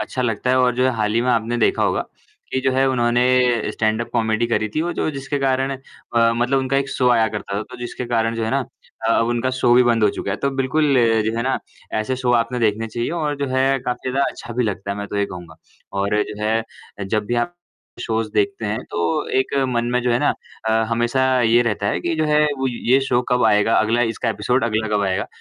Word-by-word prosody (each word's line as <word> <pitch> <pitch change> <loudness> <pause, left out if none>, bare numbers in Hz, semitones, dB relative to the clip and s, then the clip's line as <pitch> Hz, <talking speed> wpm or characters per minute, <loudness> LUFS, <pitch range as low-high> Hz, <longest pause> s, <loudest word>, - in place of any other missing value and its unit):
अच्छा 130 - -3
लगता 115 +1 -1
है 130 - +3
और 125 -1 +3
जो 125 - +2
है 130 - +3
हाल 105 -1 0
ही 115 - +3
में 125 - +1
आपने 115 0 0
देखा 115 - +2
होगा, - - +1 0.5
कि 130 - 0
जो 130 - +1
है 135 +1 +2
उन्होंने 125 -2 +2
स्टैंड-अप 110 +2 -1
कॉमेडी 115 -1 +1
करी 110 -2 0
थी - - +1
और 175 +2 -1
जो - - -1
जिसके 140 0 -4
कारण 135 0 0 0.4
अ, 115 0 +4
मतलब 120 +3 +1
उनका 135 +1 0
एक 140 0 0
शो 125 - +1
आया 115 -2 +4
करता 100 - -5
था, - - -2
तो 125 +3 -11
जिसके 120 +1 -5
कारण 115 -1 0
जो 115 - -1
है 110 - -2
ना 140 - +1 0.5
अ, - - +3
अब 115 - +2
उनका 120 +2 0
शो 120 - +4
भी 125 - +6
बंद 120 -2 +2
हो - - +5
चुका 100 - -5
है। 100 - -1
तो 140 - +2
बिल्कुल 140 +2 +1 0.3
जो 110 +1 -1
है 115 - 0
ना, 130 +1 0 0.3
ऐसे 110 +4 -1
शो 125 -1 0
आपने 125 +2 -5
देखने 110 0 +1
चाहिए 120 +4 -3
और 155 -3 -2
जो 140 0 -2
है 135 +1 +2
काफ़ी 125 0 -3
ज़्यादा 135 +2 +1
अच्छा 120 - -9
भी 125 +1 +1
लगता 100 -2 -3
है 100 - -3
मैं 100 - -4
तो - - -4
ये 100 0 +1
कहूँगा। 85 -4 -10 0.4
और 105 +2 +1
जो 105 0 -7
है 110 +1 +2 0.4
अ, - - -4
जब 105 +2 -1
भी 120 - -1
आप 120 +9 -1 0.5
शोज़ 110 -1 -1
देखते 110 +3 0
हैं, 105 +2 -1
तो 85 -1 -1
एक 130 - -1
मन 120 -2 0
में 125 - +2
जो 125 - +1
है 120 - +2
ना 145 - +1 0.4
अ, - - +2 0.2
हमेशा 120 +3 +1 0.2
ये 120 +1 +4
रहता 105 -4 -1
है - - 0
कि 170 -1 -1
जो 155 - +1
है 150 0 +3 0.2
वो 135 - 0
ये 125 +2 +2
शो 125 -2 +2
कब 125 0 +2
आएगा, 105 +2 +3
अगला 115 +2 +2
इसका 115 - -3
एपिसोड 115 +4 0
अगला 110 -1 -1
कब 100 - 0
आएगा। 95 -1 -1
120 Hz, 250 wpm, -21 LUFS, 110-130 Hz, 0.5 s, भी